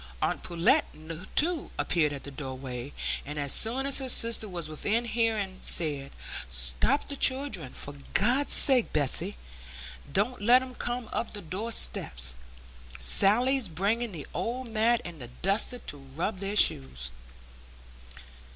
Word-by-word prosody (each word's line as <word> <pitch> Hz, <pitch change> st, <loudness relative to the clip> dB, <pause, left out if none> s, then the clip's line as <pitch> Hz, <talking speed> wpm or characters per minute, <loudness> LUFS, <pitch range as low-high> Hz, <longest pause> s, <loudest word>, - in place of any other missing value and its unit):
Aunt -, -, -3 dB
Pullet, 185 Hz, -, 0 dB, 0.5 s
too, 330 Hz, 0 st, 0 dB
appeared 155 Hz, -4 st, -1 dB
at 140 Hz, -2 st, -9 dB
the 140 Hz, -, -9 dB
doorway, 130 Hz, -2 st, -8 dB, 0.3 s
and 150 Hz, +1 st, -9 dB
as 140 Hz, -2 st, +1 dB
soon 250 Hz, +5 st, +5 dB
as 275 Hz, 0 st, +2 dB
her 265 Hz, -1 st, -5 dB
sister 230 Hz, -3 st, +2 dB
was 170 Hz, -4 st, -4 dB
within 205 Hz, +10 st, -3 dB
hearing 220 Hz, -5 st, -3 dB
said, 145 Hz, -4 st, 0 dB, 0.4 s
"Stop -, -, +3 dB
the 285 Hz, -, -7 dB
children, 260 Hz, -, +1 dB
for 145 Hz, -, -9 dB, 0.2 s
God's 245 Hz, -, +2 dB
sake! 255 Hz, -4 st, +5 dB
Bessy; 145 Hz, -, 0 dB, 0.7 s
don't 210 Hz, -, -2 dB
let 245 Hz, +4 st, +3 dB
'em 255 Hz, -1 st, -11 dB
come 245 Hz, -1 st, -5 dB
up -, -, -5 dB
the 205 Hz, -, -8 dB
door 200 Hz, +8 st, -6 dB
steps; 60 Hz, -, +2 dB, 0.6 s
Sally's 215 Hz, -, +5 dB
bringing 205 Hz, +8 st, -3 dB
the 160 Hz, -6 st, -9 dB
old 250 Hz, +1 st, -5 dB
mat 230 Hz, +2 st, 0 dB
and 170 Hz, -4 st, -10 dB
the 120 Hz, -, -9 dB, 0.2 s
duster, 200 Hz, +6 st, +2 dB
to 145 Hz, -, -7 dB
rub 150 Hz, +9 st, -6 dB
their 200 Hz, +1 st, -5 dB
shoes." 65 Hz, -, +2 dB
200 Hz, 140 wpm, -26 LUFS, 145-240 Hz, 0.7 s, soon